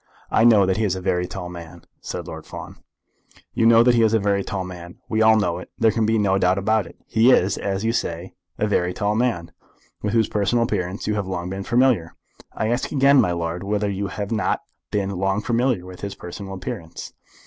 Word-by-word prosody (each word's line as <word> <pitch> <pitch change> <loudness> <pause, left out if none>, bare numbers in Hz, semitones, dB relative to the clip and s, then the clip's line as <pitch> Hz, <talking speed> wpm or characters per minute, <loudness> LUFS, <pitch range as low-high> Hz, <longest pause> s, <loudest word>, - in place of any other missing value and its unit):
"I 110 - +3
know 110 -5 +6
that 95 0 0
he 110 - 0
is 95 -3 +1
a - - -4
very 90 -1 0
tall 90 -1 -6
man," 85 -2 -10 0.2
said - - -6
Lord - - -8
Fawn. - - -9 0.8
"You 115 -1 +3
know 115 0 +7
that 125 0 +4
he 120 - +3
is 110 0 +3
a - - +3
very 100 -1 +1
tall 95 -2 -3
man. 90 -1 -9
We 110 0 0
all 110 0 +6
know 90 -5 0
it. - - -11
There 115 -1 +4
can 110 0 0
be 110 0 +2
no 95 -2 +2
doubt 90 +1 +2
about 110 +1 +1
it. - - -15
He 115 +3 +3
is, 95 -6 +4
as 100 +1 -3
you 115 - +1
say, 85 -4 -3 0.2
a - - +1
very 90 -4 0
tall 105 0 0
man, 110 -8 -1 0.5
with 105 0 -2
whose 115 -1 +3
personal 105 +3 +1
appearance 95 -4 -2
you 105 - 0
have 100 -2 -2
long 90 -1 -4
been 95 +1 -4
familiar? 120 -8 +2 0.4
I 110 - -2
ask 120 +2 -1
again, 140 -1 +5
my 90 - +1
lord, 85 0 -3
whether 105 0 -1
you 100 +1 -3
have 100 +1 -5
not 110 -2 0 0.3
been 100 -1 -1
long 95 +1 0
familiar 120 -3 0
with 90 -1 -11
his 100 -1 -5
personal 95 +2 -8
appearance?" 85 -2 -7
100 Hz, 225 wpm, -22 LUFS, 90-110 Hz, 0.8 s, know